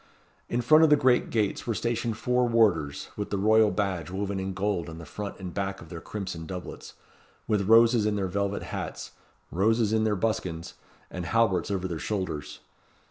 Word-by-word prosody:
In 120 Hz, -, 0 dB
front 155 Hz, +7 st, +6 dB
of 160 Hz, -, +6 dB
the 150 Hz, -, +7 dB
great 130 Hz, -3 st, +3 dB
gates 110 Hz, -1 st, -1 dB
were 115 Hz, -, 0 dB
stationed 115 Hz, -1 st, -1 dB
four 125 Hz, +2 st, +1 dB
warders 100 Hz, -12 st, +2 dB
with 105 Hz, -, -4 dB
the 100 Hz, -, -1 dB
royal 110 Hz, +2 st, +4 dB
badge 95 Hz, -7 st, -2 dB
woven 100 Hz, +1 st, -3 dB
in 95 Hz, 0 st, -3 dB
gold 95 Hz, -3 st, -1 dB
on 80 Hz, -, -8 dB
the 85 Hz, -, -9 dB
front 100 Hz, +6 st, -6 dB
and 90 Hz, -2 st, -6 dB
back 95 Hz, -1 st, -3 dB
of 80 Hz, -, -12 dB
their 85 Hz, -1 st, -7 dB
crimson 95 Hz, -6 st, -6 dB
doublets, 90 Hz, 0 st, -8 dB, 0.5 s
with 105 Hz, -2 st, 0 dB
roses 115 Hz, -1 st, +6 dB
in 105 Hz, -, 0 dB
their 100 Hz, -2 st, -1 dB
velvet 100 Hz, +2 st, -2 dB
hats, -, -, -6 dB, 0.4 s
roses 110 Hz, +3 st, +2 dB
in 110 Hz, 0 st, +2 dB
their 110 Hz, -1 st, +1 dB
buskins, 90 Hz, -5 st, -2 dB, 0.4 s
and 90 Hz, -1 st, -5 dB
halberts 110 Hz, -7 st, +2 dB
over 95 Hz, -2 st, -1 dB
their 85 Hz, -3 st, -4 dB
shoulders. 95 Hz, -8 st, -4 dB
100 Hz, 190 wpm, -27 LUFS, 90-110 Hz, 0.5 s, the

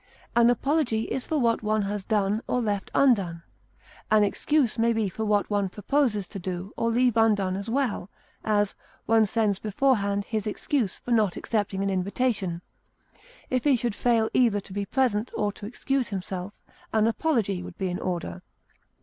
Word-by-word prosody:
An 235 Hz, 0 st, +6 dB
apology 255 Hz, -3 st, +1 dB
is 260 Hz, +2 st, -3 dB
for 315 Hz, -, -1 dB
what 235 Hz, -4 st, +2 dB
one 215 Hz, -1 st, +1 dB
has 200 Hz, 0 st, -3 dB
done 210 Hz, 0 st, +1 dB
or 250 Hz, -, +1 dB
left 205 Hz, -4 st, -2 dB
undone; 195 Hz, -11 st, +3 dB, 0.7 s
an 215 Hz, -1 st, +5 dB
excuse 245 Hz, +3 st, +1 dB
may 230 Hz, +1 st, +3 dB
be 220 Hz, -2 st, 0 dB
for 220 Hz, +4 st, -4 dB
what 210 Hz, -1 st, +2 dB
one 200 Hz, -2 st, +1 dB
proposes 210 Hz, -1 st, 0 dB
to 200 Hz, -, -7 dB
do 185 Hz, +2 st, -5 dB
or 230 Hz, -, 0 dB
leave 245 Hz, 0 st, +2 dB
undone 205 Hz, -5 st, +3 dB
as 200 Hz, +3 st, -5 dB
well; 235 Hz, -7 st, -1 dB, 0.3 s
as, 205 Hz, -2 st, +1 dB, 0.3 s
one 225 Hz, -1 st, +4 dB
sends 205 Hz, -2 st, +1 dB
beforehand 205 Hz, -3 st, +1 dB
his 215 Hz, -2 st, -2 dB
excuse 215 Hz, -1 st, -1 dB
for 245 Hz, -, -7 dB
not 215 Hz, -6 st, +2 dB
accepting 205 Hz, -3 st, -1 dB
an 195 Hz, -, 0 dB
invitation; 190 Hz, -2 st, -1 dB, 0.9 s
if 255 Hz, -1 st, +1 dB
he 285 Hz, -3 st, +4 dB
should 240 Hz, -2 st, -1 dB
fail 230 Hz, 0 st, +2 dB
either 230 Hz, -5 st, +3 dB
to 195 Hz, -1 st, -11 dB
be 200 Hz, 0 st, -2 dB
present 235 Hz, -2 st, +1 dB
or 205 Hz, -1 st, 0 dB
to 205 Hz, 0 st, -9 dB
excuse 255 Hz, +2 st, -1 dB
himself, 190 Hz, 0 st, -5 dB, 0.3 s
an 220 Hz, -1 st, +3 dB
apology 225 Hz, -, 0 dB
would -, -, -9 dB
be 190 Hz, -1 st, -1 dB
in 180 Hz, -, -3 dB
order. 170 Hz, -, -4 dB
215 Hz, 175 wpm, -26 LUFS, 195-235 Hz, 0.9 s, An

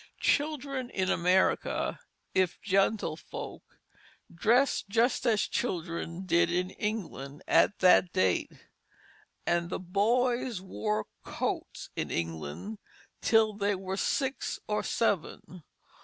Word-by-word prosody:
Children 280 Hz, -4 st, 0 dB
in 190 Hz, -3 st, 0 dB
America, 180 Hz, +2 st, +2 dB, 0.3 s
if 185 Hz, -2 st, +1 dB
gentlefolk, 195 Hz, -4 st, -1 dB, 0.7 s
dressed 230 Hz, +4 st, +2 dB
just 235 Hz, +4 st, +2 dB
as 220 Hz, -3 st, +3 dB
children 170 Hz, -3 st, -3 dB
did 175 Hz, -1 st, +3 dB
in 180 Hz, +1 st, 0 dB
England 170 Hz, -10 st, -4 dB
at 205 Hz, -, +4 dB
that 180 Hz, -1 st, +6 dB
date; 95 Hz, -1 st, +1 dB, 0.9 s
and 170 Hz, 0 st, +1 dB, 0.2 s
boys 240 Hz, +2 st, +2 dB
wore 105 Hz, -, -2 dB, 0.2 s
"coats" -, -, -4 dB
in -, -, -2 dB
England 85 Hz, -, -4 dB, 0.4 s
till 220 Hz, -1 st, +4 dB
they 205 Hz, 0 st, 0 dB
were 190 Hz, 0 st, -4 dB
six 265 Hz, +6 st, -1 dB
or 210 Hz, 0 st, 0 dB
seven. 180 Hz, -3 st, -1 dB
195 Hz, 100 wpm, -30 LUFS, 170-225 Hz, 0.9 s, that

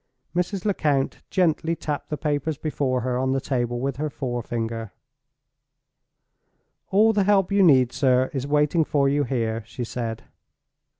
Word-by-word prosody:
Mrs. 180 Hz, +2 st, -1 dB
Lecount 150 Hz, -9 st, 0 dB
gently 165 Hz, -2 st, +1 dB
tapped 150 Hz, -3 st, -4 dB
the 150 Hz, -, -2 dB
papers 150 Hz, 0 st, -1 dB
before 135 Hz, -4 st, -1 dB
her 125 Hz, 0 st, -1 dB
on 130 Hz, 0 st, +1 dB
the 135 Hz, -, +1 dB
table 120 Hz, -3 st, -2 dB
with 135 Hz, +1 st, -2 dB
her 155 Hz, +1 st, -2 dB
forefinger. 115 Hz, -4 st, -4 dB, 2.0 s
"All 220 Hz, +3 st, +4 dB
the 205 Hz, -2 st, +2 dB
help 200 Hz, -2 st, +3 dB
you 200 Hz, 0 st, +3 dB
need, 130 Hz, -8 st, +5 dB
sir, 130 Hz, -2 st, +2 dB
is 135 Hz, -1 st, -3 dB
waiting 150 Hz, +3 st, +2 dB
for 145 Hz, -2 st, +1 dB
you 145 Hz, +1 st, +1 dB
here," 115 Hz, -3 st, -2 dB
she 125 Hz, -, -6 dB
said. 115 Hz, -1 st, -4 dB
140 Hz, 145 wpm, -24 LUFS, 125-160 Hz, 2.0 s, need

